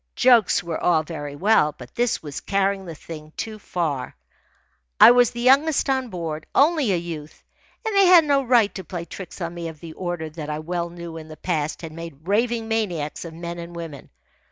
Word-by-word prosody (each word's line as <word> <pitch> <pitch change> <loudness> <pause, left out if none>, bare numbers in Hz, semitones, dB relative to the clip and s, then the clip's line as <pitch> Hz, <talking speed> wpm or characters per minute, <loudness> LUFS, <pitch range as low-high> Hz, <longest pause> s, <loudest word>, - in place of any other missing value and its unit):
Jokes 240 -7 +4
were 170 -2 -4
all 165 -3 +3
very 145 -3 -6
well, 165 -3 +3
but 125 -1 -12
this 240 -6 0
was 145 -3 -6
carrying 195 -1 0
the 165 - -7
thing 155 0 -10
too 220 -1 -5
far. 160 -9 -3 0.8
I - - +10
was 245 -1 +5
the 235 - -6
youngest 275 +3 +4
on 260 -1 0
board, 165 -5 -5
only 290 -5 +4
a - - +3
youth, 165 -3 -7 0.4
and 440 -2 -1
they 395 -1 +6
had 350 -3 +8
no 280 -2 +3
right 240 -5 +3
to 190 - -6
play 170 0 -6
tricks 185 +3 -9
on 170 0 -3
me 170 -1 -5
of 160 -2 -9
the 165 0 -9
order 175 -3 -4
that 155 -1 -7
I 150 - -2
well 170 +2 -3
knew 170 -1 -8
in 155 -1 -9
the 155 -1 -11
past 155 -2 -2
had 160 - -6
made 165 -1 -10
raving 230 +2 +1
maniacs 180 -10 -2
of 165 -1 -8
men 170 +1 -6
and 170 0 -8
women. 165 -5 -8
175 Hz, 205 wpm, -23 LUFS, 160-225 Hz, 0.8 s, I